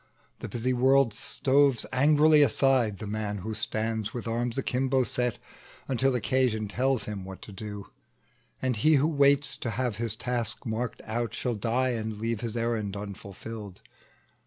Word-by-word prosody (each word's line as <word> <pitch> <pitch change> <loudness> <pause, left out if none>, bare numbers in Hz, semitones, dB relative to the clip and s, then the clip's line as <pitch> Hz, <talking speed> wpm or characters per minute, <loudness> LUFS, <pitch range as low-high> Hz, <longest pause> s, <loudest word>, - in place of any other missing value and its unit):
The - - -6
busy 125 +2 -1
world 130 -1 +4
shoves 135 +3 +2
angrily 150 +3 +5
aside 130 -4 +3
The 110 - -7
man 105 0 -3
who 110 - -3
stands 110 0 -2
with 120 - -5
arms 120 +1 -1
akimbo 130 0 +1
set, 125 -2 -1 0.5
Until 135 0 +1
occasion 120 -2 +1
tells 125 +2 0
him 105 -3 -5
what 95 0 -9
to - - -10
do; 105 0 -7 0.8
And 130 -3 0
he 155 +8 +4
who 140 +1 +3
waits 140 -2 +4
to 120 - -4
have 120 -1 -2
his 115 -1 -1
task 120 -2 -3
marked 115 +1 -3
out 115 0 -2
Shall 125 0 -1
die 120 +4 0
and 110 -3 -3
leave 115 0 -2
his 120 -1 -3
errand 110 -4 -1
unfulfilled. 100 0 -8
115 Hz, 160 wpm, -28 LUFS, 110-130 Hz, 0.8 s, angrily